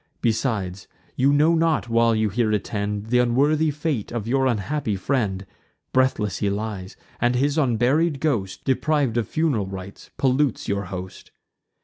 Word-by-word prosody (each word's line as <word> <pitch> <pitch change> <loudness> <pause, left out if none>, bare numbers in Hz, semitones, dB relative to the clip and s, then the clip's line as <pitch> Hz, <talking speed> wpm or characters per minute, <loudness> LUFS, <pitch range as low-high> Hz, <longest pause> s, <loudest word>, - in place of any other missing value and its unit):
Besides, 110 -6 -1 0.3
you 135 +2 +3
know 150 +3 +4
not, 165 -5 +1
while 115 0 +3
you 110 -1 +1
here 110 +2 0
attend, 105 +1 -2
Th' 125 - +4
unworthy 145 +6 +2
fate 150 -6 -2
of 115 -2 -4
your 135 +2 +2
unhappy 120 0 -1
friend: 100 -3 -1 0.5
Breathless 120 -8 +1
he 100 - +1
lies; 100 -2 -4 0.2
and 120 +1 +2
his 140 +3 +1
unburied 140 +3 +2
ghost, 120 -11 -1
Depriv'd 140 -2 +1
of 115 -4 -1
fun'ral 145 -11 0
rites, 95 0 -9
pollutes 135 -1 +1
your 100 0 -1
host. 95 0 -8
120 Hz, 145 wpm, -23 LUFS, 105-140 Hz, 0.5 s, know